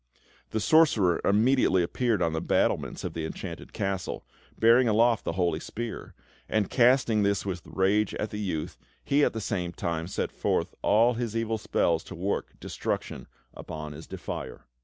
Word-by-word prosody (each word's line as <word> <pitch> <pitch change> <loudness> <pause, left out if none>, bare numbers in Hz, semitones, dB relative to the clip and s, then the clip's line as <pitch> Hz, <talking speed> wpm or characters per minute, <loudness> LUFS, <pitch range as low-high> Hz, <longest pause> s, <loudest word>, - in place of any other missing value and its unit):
The - - -1
sorcerer 110 - +4
immediately 105 -3 +3
appeared 110 +1 0
on 80 - 0
the 80 - -1
battlements - - 0
of - - -4
the 80 - -4
Enchanted 80 - -7
Castle, 95 -2 -3 0.3
bearing 120 +2 +5
aloft 115 +1 +3
the - - -1
holy 85 -3 0
spear; 115 +5 -6 0.3
and, 110 -3 0
casting 120 -3 +4
this 100 0 +1
with 90 -3 -3
rage 100 +2 +1
at 105 - -3
the 105 - -5
youth, 90 -7 -3 0.3
he 145 +1 +3
at - - +2
the 110 - -3
same 90 -4 -2
time 85 0 -3
set - - -3
forth - - -1 0.4
his 115 -2 -2
evil 115 -1 -1
spells 85 -5 +1
to - - -9
work 95 +4 -2
destruction - - -4 0.3
upon 75 -1 -7
his 80 +2 -10
defier. - - -6
100 Hz, 160 wpm, -27 LUFS, 85-115 Hz, 0.4 s, bearing